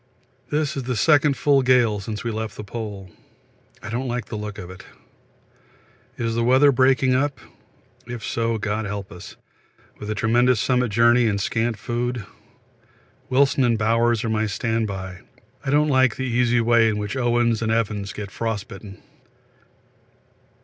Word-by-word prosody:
This 150 Hz, -1 st, -1 dB
is 135 Hz, -, -2 dB
the 125 Hz, 0 st, -2 dB
second 145 Hz, +3 st, +3 dB
full 140 Hz, -2 st, +3 dB
gale 125 Hz, -5 st, +3 dB
since 105 Hz, +1 st, -6 dB
we 115 Hz, -, -2 dB
left 110 Hz, -1 st, -5 dB
the -, -, -6 dB
Pole. 100 Hz, -4 st, -7 dB, 0.7 s
I 105 Hz, -, -6 dB
don't 125 Hz, +3 st, -2 dB
like 120 Hz, -2 st, -3 dB
the -, -, -7 dB
look 105 Hz, -1 st, -6 dB
of 90 Hz, 0 st, -8 dB
it. 95 Hz, -, -12 dB, 1.3 s
Is 115 Hz, -1 st, -2 dB
the 115 Hz, +1 st, 0 dB
weather 130 Hz, +4 st, +5 dB
breaking 130 Hz, 0 st, +3 dB
up? 135 Hz, 0 st, 0 dB, 0.7 s
If 120 Hz, -3 st, -6 dB
so, 115 Hz, 0 st, -1 dB
God 105 Hz, +1 st, -2 dB
help 100 Hz, -1 st, -5 dB
us, 90 Hz, +2 st, -11 dB, 0.6 s
with 105 Hz, -, -7 dB
the 110 Hz, -, -2 dB
tremendous 120 Hz, +3 st, +2 dB
summit 125 Hz, 0 st, +1 dB
journey 120 Hz, +2 st, +4 dB
and 100 Hz, -2 st, 0 dB
scant 115 Hz, +3 st, -1 dB
food. 120 Hz, +1 st, -3 dB, 1.0 s
Wilson 135 Hz, +1 st, +3 dB
and 120 Hz, -2 st, +2 dB
Bowers 115 Hz, +2 st, +2 dB
are 115 Hz, -, -2 dB
my 110 Hz, 0 st, 0 dB
standby. 100 Hz, -4 st, -3 dB, 0.4 s
I 140 Hz, -, -3 dB
don't 150 Hz, +2 st, +3 dB
like 130 Hz, -4 st, +3 dB
the 130 Hz, -, -4 dB
easy 120 Hz, -1 st, +2 dB
way 115 Hz, -1 st, +4 dB
in 105 Hz, -, -1 dB
which 105 Hz, +4 st, -4 dB
Oates 120 Hz, -2 st, +1 dB
and 110 Hz, -1 st, 0 dB
Evans 105 Hz, -3 st, -1 dB
get 100 Hz, -2 st, -7 dB
frostbitten. 105 Hz, -3 st, -5 dB
115 Hz, 160 wpm, -22 LUFS, 105-125 Hz, 1.3 s, weather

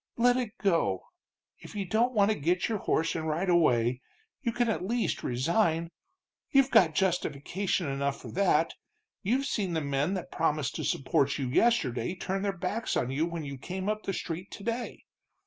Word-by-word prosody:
Let 245 Hz, +1 st, +4 dB
it 240 Hz, -4 st, -3 dB
go. 165 Hz, -, +1 dB, 0.6 s
If -, -, -12 dB
you 200 Hz, -2 st, -2 dB
don't 230 Hz, +7 st, +1 dB
want 205 Hz, 0 st, +4 dB
to -, -, +1 dB
get 175 Hz, +5 st, +1 dB
your 220 Hz, -3 st, -1 dB
horse 165 Hz, -2 st, +1 dB
and 160 Hz, -1 st, -2 dB
ride 165 Hz, +5 st, 0 dB
away, 125 Hz, -8 st, +3 dB, 0.4 s
you 240 Hz, -4 st, 0 dB
can 240 Hz, +1 st, +1 dB
at 220 Hz, -5 st, -1 dB
least 230 Hz, +4 st, -1 dB
resign. 165 Hz, -, +1 dB, 0.6 s
You've 275 Hz, -1 st, +4 dB
got 160 Hz, -4 st, +5 dB
justification 180 Hz, 0 st, 0 dB
enough 140 Hz, 0 st, -1 dB
for -, -, -9 dB
that, 175 Hz, -4 st, +2 dB, 0.5 s
you've 250 Hz, +7 st, +1 dB
seen 200 Hz, -9 st, -1 dB
the 160 Hz, -, +1 dB
men 140 Hz, +6 st, 0 dB
that 185 Hz, -, -5 dB
promised 150 Hz, -4 st, 0 dB
to -, -, -3 dB
support 140 Hz, +1 st, +1 dB
you 135 Hz, -3 st, -2 dB
yesterday 140 Hz, -, +2 dB
turn 190 Hz, +1 st, -3 dB
their 200 Hz, -1 st, -1 dB
backs 205 Hz, +6 st, -1 dB
on 125 Hz, -, 0 dB
you 150 Hz, +5 st, 0 dB
when 170 Hz, -3 st, -5 dB
you 140 Hz, -2 st, -6 dB
came 185 Hz, +6 st, -5 dB
up 215 Hz, 0 st, 0 dB
the 195 Hz, -, -3 dB
street 175 Hz, +2 st, -4 dB
today. 230 Hz, +4 st, -4 dB
180 Hz, 180 wpm, -29 LUFS, 150-210 Hz, 0.6 s, got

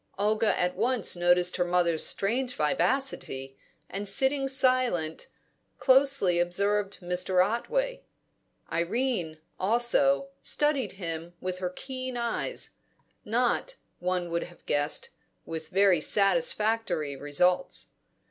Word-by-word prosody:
Olga 215 Hz, +2 st, +1 dB
at 180 Hz, 0 st, 0 dB
once 245 Hz, -5 st, +1 dB
noticed 175 Hz, +1 st, +3 dB
her 180 Hz, -, +2 dB
mother's 175 Hz, -2 st, +1 dB
strange 245 Hz, +5 st, +1 dB
vivacity, 150 Hz, -, -1 dB, 0.3 s
and, 200 Hz, +1 st, -4 dB
sitting 270 Hz, +6 st, +2 dB
silent, 255 Hz, -12 st, +1 dB, 0.5 s
closely 265 Hz, -10 st, +4 dB
observed 200 Hz, +4 st, 0 dB
Mr. 180 Hz, +1 st, +2 dB
Otway. -, -, -2 dB, 0.7 s
Irene, 175 Hz, -2 st, -1 dB, 0.2 s
also, 240 Hz, +7 st, +2 dB
studied 295 Hz, -3 st, 0 dB
him 170 Hz, -2 st, -6 dB
with 185 Hz, 0 st, -4 dB
her 180 Hz, -1 st, -2 dB
keen 255 Hz, +5 st, -6 dB
eyes; 235 Hz, -1 st, -2 dB, 0.5 s
not, 245 Hz, -, 0 dB, 0.2 s
one 180 Hz, -1 st, -2 dB
would 170 Hz, 0 st, -1 dB
have 175 Hz, -1 st, -17 dB
guessed, 145 Hz, +1 st, 0 dB, 0.4 s
with 160 Hz, -1 st, -6 dB
very 190 Hz, -3 st, +4 dB
satisfactory 210 Hz, -, +1 dB
results. 180 Hz, -, 0 dB
195 Hz, 105 wpm, -28 LUFS, 175-255 Hz, 0.7 s, closely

